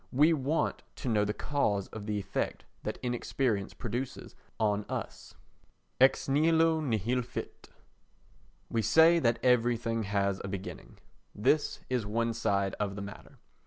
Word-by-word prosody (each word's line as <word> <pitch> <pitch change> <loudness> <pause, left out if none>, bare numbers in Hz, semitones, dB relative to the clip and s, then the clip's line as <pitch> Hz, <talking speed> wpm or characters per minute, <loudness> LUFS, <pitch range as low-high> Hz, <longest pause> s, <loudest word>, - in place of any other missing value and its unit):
We 150 +5 +5
want 150 +2 0
to - - -6
know 105 -2 +3
the 105 - 0
cause 105 -6 0
of 110 -1 -8
the 105 -1 -1
effect 100 - -3 0.2
that - - -4
inexperience 120 -4 -1
produces 120 +2 -5 0.3
on 105 -1 +1
us. - - -6 0.6
Ex 135 +1 +4
Nihilo 160 +3 +3
Nihil 125 -3 0
Fit 120 - -7 1.0
We 115 - 0
say 160 - +6
that 115 -5 +2
everything 120 -2 +2
has 100 -1 0
a - - -4
beginning. 95 -1 -7 0.4
This 135 +8 +1
is 125 -3 0
one 115 +3 -1
side 100 -3 0
of 100 -2 -1
the 100 - -5
matter. 100 0 -11
115 Hz, 140 wpm, -30 LUFS, 105-135 Hz, 1.0 s, say